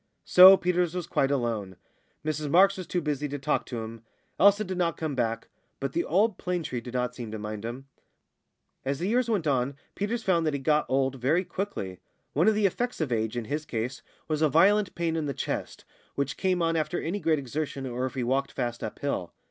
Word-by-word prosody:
So 185 +2 +9
Peters 180 -1 0
was 180 -2 -2
quite 135 - +1
alone. 115 -8 -1 0.5
Mrs 155 -1 -2
Marks 195 +5 +5
was 185 -2 -7
too 180 - -1
busy 150 -1 -2
to 145 0 -4
talk 135 - -1
to 115 -3 -4
him. 115 0 -8 0.4
Elsa 200 +2 +6
did 185 -2 -4
not 170 -2 0
come 155 -3 -2
back. 115 -3 -1 0.3
But 135 -1 -3
the 170 - 0
old 200 +4 +2
plane 180 -2 -2
tree 125 -5 -4
did 125 +1 -8
not 125 0 0
seem 120 -3 -7
to 110 - -5
mind 105 0 -6
him. 120 +4 -6 1.0
As 135 +1 -1
the 175 - -2
years 240 +2 +1
went 200 -8 0
on 135 -1 +1 0.2
Peters 225 +3 -2
found 170 -4 +2
that 150 - 0
he - - -2
got 150 +2 +2
old 135 0 +1
very 155 +8 +2
quickly. 100 - -4 0.3
One 160 +8 +3
of 220 - +5
the 210 -1 +2
effects 245 +6 -1
of 155 -6 -1
age, 110 0 -1
in 120 - -3
his 150 +6 -3
case, 120 -2 -4 0.3
was 155 -1 -1
a 155 - +4
violent 195 +6 +4
pain 170 -1 -1
in 160 -2 -1
the 140 - -3
chest, - - -4 0.3
which 140 -2 -1
came 185 -2 +1
on 165 0 +1
after 160 +2 -1
any 185 +6 -2
great 160 -5 +2
exertion 140 0 -4
or 125 0 -2
if 130 - -9
he 130 - -1
walked 135 +3 0
fast 120 -2 -3
uphill. 95 -11 -3
150 Hz, 220 wpm, -27 LUFS, 125-180 Hz, 1.0 s, So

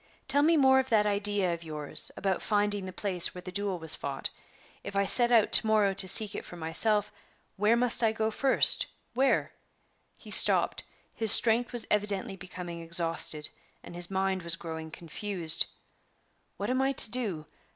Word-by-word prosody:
Tell 280 +1 +1
me 320 +2 +2
more 265 -2 +3
of 265 0 -4
that 215 -3 +1
idea 205 -3 +1
of 170 0 -9
yours 150 -2 -1
about 195 -2 -3
finding 205 -2 -2
the - - -8
place 185 -2 +2
where 180 - -9
the 185 - -9
duel 200 -1 -4
was 160 -2 +4
fought. 140 -1 -5 0.5
If 200 - -9
I 200 0 0
set 240 +4 +3
out 230 -3 +2
to 220 - +6
morrow 210 -2 +1
to 195 0 +1
seek 205 +2 +7
for - - -13
it - - -13
myself, 205 +6 -1 0.4
where 210 +3 +1
must 245 0 0
I 225 -2 +1
go 220 0 -3
to - - -12
first? 270 -1 +2 0.3
where?" 265 +3 -1 0.7
He - - -15
stopped; - - +2 0.3
his 225 -2 +4
strength 235 +1 +5
was 240 -2 -1
evidently 200 -2 -2
becoming 180 -2 -10
exhausted, 165 -2 -1 0.3
and - - -13
his 175 0 0
mind 190 -1 -3
was 170 -1 +6
growing 160 -1 -9
confused. 170 0 -3 0.9
"What - - -4
am 260 +1 -1
I 270 +1 -1
to 225 - -1
do? 205 -11 -5
200 Hz, 185 wpm, -27 LUFS, 175-225 Hz, 0.9 s, seek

